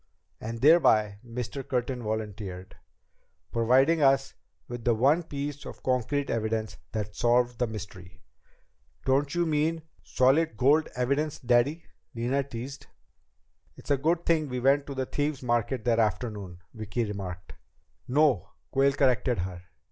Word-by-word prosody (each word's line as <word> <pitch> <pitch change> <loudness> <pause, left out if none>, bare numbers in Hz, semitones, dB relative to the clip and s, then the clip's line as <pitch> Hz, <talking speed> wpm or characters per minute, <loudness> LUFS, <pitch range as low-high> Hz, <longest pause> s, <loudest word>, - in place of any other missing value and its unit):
"And 115 +1 -6
thereby," 110 -10 +5
Mr. 120 +2 -5
Curtin 125 -1 -2
volunteered, 105 -4 -5 0.8
"providing 130 +8 +3
us 135 -1 +3 0.3
with 120 -1 -7
the 120 -1 +3
one 140 +9 +3
piece 145 -3 -5
of - - -10
concrete 130 +3 0
evidence 110 -1 -2
that 105 -2 -4
solved 120 +1 +2
the 120 - +1
mystery." 95 -4 -9 0.8
"Don't 140 +3 +1
you 175 0 +2
mean 160 +1 0 0.2
solid 135 0 +2
gold 145 +7 +3
evidence, 140 +5 0
Daddy?" 130 +6 +2 0.3
Nina 125 +4 0
teased. 135 +1 -8 0.9
"It's - - -8
a 140 - +4
good 165 +5 0
thing 155 -3 +2
we 125 0 -3
went 140 +3 +3
to 140 - -6
the 130 0 -1
Thieves' 145 0 -2
Market 120 0 0
that 115 -1 +2
afternoon," 105 -4 -2 0.2
Vicki 110 +2 -3
remarked. 95 -4 -6 0.5
"No," 135 - +2 0.2
Quayle 135 +1 +3
corrected 130 -3 +2
her. 90 0 -4
125 Hz, 135 wpm, -28 LUFS, 110-140 Hz, 0.9 s, thereby